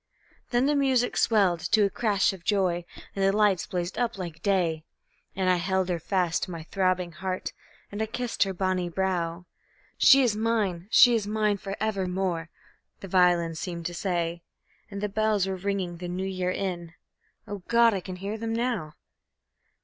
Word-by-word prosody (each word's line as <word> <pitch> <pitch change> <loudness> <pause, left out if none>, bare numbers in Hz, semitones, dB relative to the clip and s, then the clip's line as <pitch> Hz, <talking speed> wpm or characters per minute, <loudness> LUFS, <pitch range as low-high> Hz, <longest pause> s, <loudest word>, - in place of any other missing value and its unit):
Then 245 +1 +2
the 295 - +2
music 265 -4 +2
swelled 195 -6 +3
to 215 -2 +6
a - - +1
crash 205 -2 +1
of 185 -3 -11
joy, 180 -3 +1 0.3
and 195 - -1
the 195 - +4
lights 205 -3 +2
blazed 175 +2 -3
up 240 -4 -1
like 170 -3 -7
day, 175 -6 +1 0.5
And 190 -1 0
I 180 -1 +4
held 190 +1 0
her 175 -2 -1
fast 180 -1 0
to - - -3
my 165 -3 -6
throbbing 185 0 0
heart, 185 +2 -4 0.4
and 205 +1 -4
I 220 - 0
kissed 245 +1 -4
her 195 - +4
bonny 185 -1 -1
brow. 175 -1 -2 0.5
"She 275 -1 +7
is 230 -4 +2
mine, 210 -5 -1
she 245 +2 +7
is 220 -3 0
mine 210 -1 +1
for 195 0 -6
evermore!" 185 -5 -1 0.5
the 195 - -7
violins 175 -3 +2
seemed 170 -2 -5
to 175 - -3
say, 170 -2 -2 0.5
And 200 -1 -6
the 210 - 0
bells 215 -1 +1
were 190 0 -2
ringing 190 -2 -3
the 175 +1 -6
New 180 +2 -3
Year 185 -1 -2
in 175 -3 -3 0.5
O 205 -1 -5
God! 235 -1 +5
I 195 - -1
can 185 0 -7
hear 200 +4 -5
them 225 0 -3
now. 230 -10 -2
190 Hz, 180 wpm, -27 LUFS, 175-210 Hz, 0.5 s, She